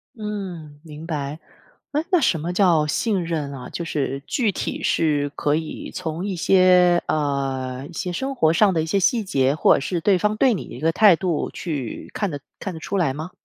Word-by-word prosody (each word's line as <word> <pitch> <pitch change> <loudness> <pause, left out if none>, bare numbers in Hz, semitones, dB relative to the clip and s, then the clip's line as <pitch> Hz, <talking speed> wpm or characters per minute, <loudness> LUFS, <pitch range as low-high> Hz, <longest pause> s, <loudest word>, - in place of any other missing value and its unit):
嗯， 190 -9 -6
明 155 0 -10
白。 150 -2 -4 0.5
哎， 300 +2 0
那 360 - +5
什 235 - +2
么 165 +4 -3
叫 175 -5 +3
信 195 +5 0
任 155 -4 -3
啊？ 130 -2 -8
就 170 - -5
是 140 -4 -2
具 230 -6 +1
体 - - -4
是 145 -3 +1
可 145 0 +1
以 160 0 -5
从 170 -1 -4
一 200 -2 -2
些， 180 0 +5
呃， 135 -3 -2
一 175 - -13
些 180 +2 -3
生 270 +9 -3
活 160 -10 +3
上 190 +4 +4
的 160 - +1
一 - - -2
些 180 +5 +1
细 225 +4 +2
节， 135 -7 +1
或 - - +5
者 - - +2
是 170 +4 -2
对 195 +2 +3
方 210 +4 0
对 250 +3 +3
你 195 - -3
一 - - -10
个 165 +1 +2
态 205 +1 +6
度 170 -2 -1
去 145 -9 -5
看 205 - -1
得 145 -3 -5 0.2
看 190 - -5
得 160 - -8
出 200 - -2
来 160 -8 +1
吗？ 155 +6 -6
165 Hz, 230 characters per minute, -22 LUFS, 150-195 Hz, 0.5 s, 态